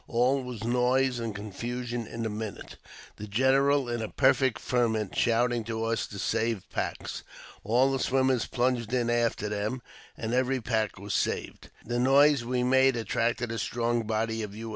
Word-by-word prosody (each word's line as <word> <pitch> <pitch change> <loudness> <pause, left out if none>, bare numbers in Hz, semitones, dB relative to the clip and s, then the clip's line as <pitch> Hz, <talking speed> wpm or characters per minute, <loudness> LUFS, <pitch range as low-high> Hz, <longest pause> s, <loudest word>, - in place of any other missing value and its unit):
All 125 +3 +2
was 125 -4 -7
noise 125 +2 +2
and 115 -3 -4
confusion 120 +3 -4
in 115 -1 -5
a - - -1
minute, 110 0 -6 0.4
the 105 - -7
general, 135 +5 +3
in 120 -1 -2
a 110 - -4
perfect 130 -2 +3
ferment, 110 -5 0
shouting 120 0 +2
to 110 0 -3
us 115 0 -1
to 100 - -9
save 110 0 -1
packs. - - -4 0.4
All 125 +6 +3
the 135 - -1
swimmers 130 -2 +1
plunged 120 -2 0
in 120 -1 +1
after 120 -3 0
them, 105 +4 -3 0.3
and 115 +1 -3
every 130 +1 +1
pack 110 -3 -1
was 100 +1 -5
saved. - - -2 0.2
The 120 +1 -1
noise 140 +1 +5
we 125 +1 -1
made 130 +1 +4
attracted 120 +1 -1
a 115 - -3
strong 120 0 0
body 110 +1 -1
of 105 -1 -6
U. 115 +1 -6
120 Hz, 170 wpm, -28 LUFS, 110-125 Hz, 0.4 s, noise